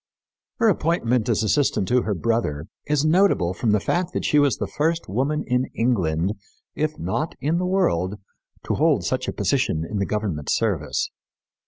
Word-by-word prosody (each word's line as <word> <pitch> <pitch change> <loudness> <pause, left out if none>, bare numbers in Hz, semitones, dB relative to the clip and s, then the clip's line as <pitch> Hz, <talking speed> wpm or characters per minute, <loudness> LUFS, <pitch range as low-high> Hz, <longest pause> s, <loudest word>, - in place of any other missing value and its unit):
Her 230 - +2
appointment 135 - +1
as 110 -1 +2
assistant 130 -3 +1
to 125 0 +3
her 105 -3 -2
brother 90 -8 -1 0.2
is 150 0 +1
notable 155 - +3
from 115 +4 -1
the 105 0 +3
fact 175 - -1
that - - -2
she 150 - +4
was 145 -2 +3
the - - -2
first 165 +2 -1
woman 135 +9 -1
in 125 0 +1
England, 95 -6 +1 0.4
if 155 0 -2
not 155 - -2
in 160 +4 0
the 180 - -1
world, 105 - +1 0.5
to - - -1
hold - - +2
such - - -1
a - - 0
position 80 +1 0
in 105 - -3
the 100 - 0
government 100 -9 -2
service. 85 - 0
120 Hz, 175 wpm, -23 LUFS, 100-155 Hz, 0.5 s, she